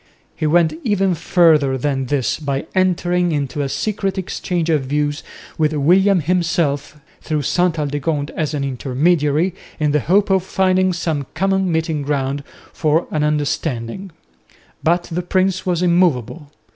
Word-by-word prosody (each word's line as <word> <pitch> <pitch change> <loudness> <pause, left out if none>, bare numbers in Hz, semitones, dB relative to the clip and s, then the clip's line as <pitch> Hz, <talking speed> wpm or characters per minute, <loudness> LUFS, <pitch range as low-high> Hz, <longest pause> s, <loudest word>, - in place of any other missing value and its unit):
He 155 - -1
went 165 0 +3
even 195 -3 +1
further 155 -5 +3
than 135 0 -1
this 135 -2 0
by 140 -3 -2
entering 180 -1 +1
into 145 -1 -2
a 140 - -2
secret 195 +2 -2
exchange 180 -2 -2
of 155 -5 +1
views 145 +2 -1 0.4
with 155 0 +2
William 180 +6 +4
himself 155 -4 -1 0.2
through 150 -2 -2
Ste 175 +3 +1
Aldegonde 145 0 -2
as 155 -1 -2
an 140 - -2
intermediary, 150 +5 +1 0.3
in 150 -1 +1
the 150 - +2
hope 195 - +2
of 190 -1 +3
finding 185 0 +1
some 160 -6 -2
common 190 +1 +1
meeting 160 -2 -1
ground 140 -1 -2 0.3
for 160 +1 +1
an 150 -1 0
understanding. 150 +2 -2 0.7
But 175 +2 +2
the 175 +1 -4
prince 185 +1 0
was 180 -1 +1
immovable. 170 - +1
160 Hz, 145 wpm, -19 LUFS, 145-180 Hz, 0.7 s, William